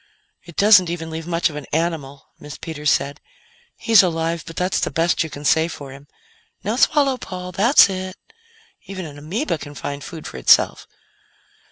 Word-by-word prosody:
"It 170 -2 -13
doesn't 200 -4 +6
even 165 -1 -5
leave 160 +1 -6
much 170 -1 0
of - - -11
an 150 -2 -7
animal," 155 -4 -3
Miss 150 -1 -9
Peters 150 -2 -3
said. 140 +2 0 0.6
"He's 225 -2 +5
alive, 165 -2 -1
but 165 - -9
that's 180 +2 0
the - - -1
best 170 +1 +1
you 160 - -6
can 145 0 -9
say 160 +2 +3
for 145 -5 -9
him. 140 +2 -13 0.6
(Now 215 +3 -1
swallow, 275 -1 +3
Paul. 180 -5 -7
That's 225 - +6
it.) 185 -1 -5 0.7
Even 190 -2 -6
an 145 -2 -10
ameba 170 - -3
can 145 0 -10
find 140 0 -6
food 160 0 -9
for - - -7
itself." - - +3
165 Hz, 180 wpm, -21 LUFS, 150-185 Hz, 0.7 s, doesn't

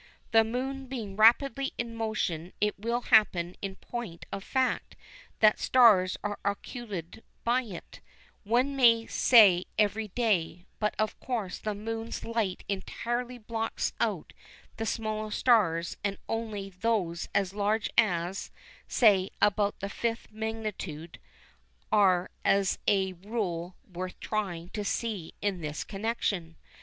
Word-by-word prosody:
The 225 -1 +6
Moon 260 +4 -3
being 225 -7 -5
rapidly 255 +5 +4
in 235 -1 -3
motion 200 -7 -2
it 210 -1 0
will 235 +3 -1
happen 180 -7 +3
in 195 -1 -4
point 225 -9 -7
of 195 - -5
fact 260 +1 -1 0.5
that 215 -1 +6
stars 210 -8 +5
are 205 0 -3
occulted 200 -2 -5 0.2
by 245 +2 +2
it, 205 -9 -10 0.4
one 245 +6 +1
may 230 -3 +5
say 200 -9 +6
every 215 +1 +1
day, 185 -6 0
but 210 -1 0
of 215 0 -1
course 225 -8 -3
the 215 -1 -3
Moon's 225 +2 -5
light 225 -5 -1
entirely 240 +5 -3
blots 225 0 -3
out - - -1 0.4
the 225 - -2
smaller 215 -1 -2
stars 195 -8 +2
and 200 -1 -1
only 215 -3 -3
those 180 -3 -1
as 195 -1 +1
large 210 +1 0
as, 185 -3 +1 0.4
say, 200 -5 +4
about 205 0 +2
the 200 - -2
5th 230 +3 -3
magnitude 215 -7 -5 0.7
are 185 -3 +4
as 195 -1 +2
a 190 -2 +2
rule 185 -3 -4
worth 185 0 -6
trying 180 -6 -3
to 210 +1 -4
see 205 -5 -3
in 195 -4 -1
this 150 -1 -4
connection. 195 -5 -2
210 Hz, 130 wpm, -29 LUFS, 185-230 Hz, 0.7 s, The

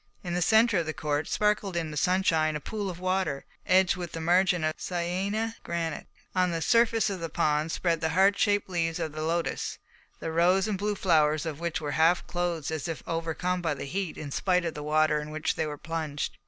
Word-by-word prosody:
In 175 -2 -3
the 180 - 0
centre 220 +2 +4
of 165 - -2
the 155 - -3
court 150 0 -1
sparkled 210 -3 0
in 160 -2 -2
the - - -7
sunshine 160 -2 +2
a - - -2
pool 205 +5 -4
of 175 -1 -7
water, 185 -6 -1 0.2
edged 185 -1 +4
with 175 -3 -6
a - - -3
margin 180 +1 +3
of 155 0 0
Syêné 190 +6 -2
granite. 165 -2 -3 0.3
On 185 -1 +2
the 165 -1 -1
surface 230 +1 +3
of 190 - -4
the 165 -1 -4
pond 150 +1 +1
spread 165 -2 0
the 160 - +1
heart 195 +4 +4
shaped 205 -1 +2
leaves 165 -3 -1
of 165 -3 -3
the 155 +1 -6
lotus, 165 +2 -1 0.4
the 165 - -4
rose 180 +4 +3
and 215 - 0
blue 205 +1 -1
flowers 155 -5 +2
of 155 -2 -4
which 170 0 -2
were 150 -2 -3
half 170 +2 +4
closed 175 -4 -2
as 160 +1 -3
if 165 -2 -5
overcome 165 +2 -2
by 160 -4 0
the 140 - -6
heat 185 +3 -3
in 145 -2 -6
spite 180 +3 +1
of 165 - -2
the 150 - -6
water 155 0 +2
in 150 - -7
which 155 0 -1
they 155 - -2
were 150 -1 -5
plunged. 155 -2 -4
170 Hz, 220 wpm, -28 LUFS, 155-185 Hz, 0.4 s, centre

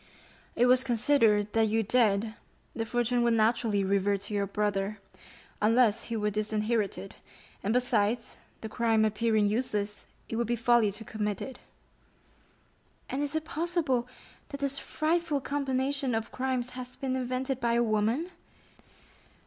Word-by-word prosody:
"It 245 - +4
was 250 +1 +5
considered, 230 -5 +2
that 225 -1 +3
you 220 +1 +1
dead, 220 -1 +2 0.4
the 225 -1 -3
fortune 240 +1 +1
would 235 -1 +3
naturally 220 -2 +2
revert 200 0 +1
to 205 +1 -5
your 200 -1 0
brother, 205 0 -1 0.6
unless 225 0 +3
he 230 -1 -3
were 210 0 0
disinherited; 215 -1 -1 0.5
and 205 - -1
besides, 235 -2 +1 0.2
the 220 - -4
crime 225 -1 +2
appearing 215 0 +2
useless, 210 -2 -2 0.2
it 225 - -4
would 235 -1 0
be 240 - +1
folly 235 -2 +3
to 220 +2 -9
commit 210 -2 -3
it." 265 - -7 1.5
"And 270 - -1
is 290 +1 -2
it 315 0 -1
possible 315 -7 -1 0.4
that 280 - -6
this 275 0 -2
frightful 320 -1 0
combination 270 -2 -1
of 225 0 -3
crimes 255 -1 -2
has 250 0 -8
been 260 -1 -2
invented 255 +1 -2
by 235 -1 +1
a 235 0 +3
woman?" 225 - 0
230 Hz, 145 wpm, -29 LUFS, 210-255 Hz, 1.5 s, was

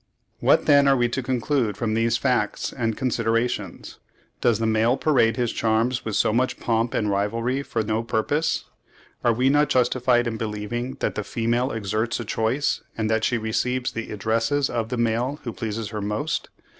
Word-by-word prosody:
What - - +3
then 140 -1 +5
are 135 -1 +5
we 120 -1 +2
to 130 - -2
conclude 125 -3 0
from 110 -2 -1
these 115 +1 +2
facts 130 -1 0
and 115 -4 -2
considerations? 115 -5 -1 0.4
Does 120 -3 +3
the 115 - -1
male 110 +3 +2
parade 120 -7 +2
his 120 -2 0
charms 115 +3 +1
with 110 -2 -3
so - - +2
much 130 +3 0
pomp 115 0 0
and 105 - 0
rivalry 115 +6 0
for 115 -5 -2
no 110 +1 -1
purpose? 120 +8 0 0.6
Are 120 - +4
we 125 +3 +1
not 145 +1 +3
justified 125 -2 +2
in 115 -1 -2
believing 110 +4 -4
that - - 0
the 105 - -3
female 120 +5 0
exerts 110 +2 -2
a 120 - -4
choice, 115 +7 0 0.2
and 110 0 0
that 110 0 +1
she 120 - +2
receives 125 +3 -1
the 115 - -5
addresses 115 +7 0
of 115 -2 -2
the 125 - -2
male 120 +5 0
who 120 - -4
pleases 110 -2 -4
her 105 -1 -4
most? 105 +10 -2
115 Hz, 180 wpm, -24 LUFS, 110-125 Hz, 0.6 s, then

